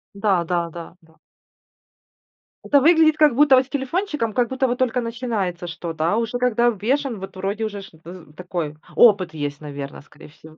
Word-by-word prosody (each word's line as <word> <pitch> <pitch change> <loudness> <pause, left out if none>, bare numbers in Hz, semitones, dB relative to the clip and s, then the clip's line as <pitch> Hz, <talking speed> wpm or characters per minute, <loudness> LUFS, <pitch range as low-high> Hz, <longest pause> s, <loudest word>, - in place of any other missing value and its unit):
Да 200 -4 +1
да 170 0 -1
да 165 0 -9
да. 160 -1 -24 1.5
Это 285 - +4
выглядит 315 +1 +4
как 300 -4 +5
будто 285 0 +6
вот 255 0 +3
с - - -26
телефончиком, 285 - -2
как 245 +1 +1
будто 260 0 0
вот 245 0 -2
только 250 -1 0
начинается 225 -7 -3
что-то. 165 0 -3
А - - +1
уже 235 +2 -2
когда 240 -1 +2
обвешан, 240 +2 -1
вот 195 0 -9
вроде 200 +4 -3
уже 205 -2 -5
ж 195 - -12 0.2
з 170 -3 -12
такой 175 -4 -5 0.2
опыт 195 -8 +5
есть, 145 -1 -5
наверное, 140 -2 -7
скорее 150 +2 -16
всего. 155 +1 -17
210 Hz, 180 wpm, -22 LUFS, 170-255 Hz, 1.5 s, будто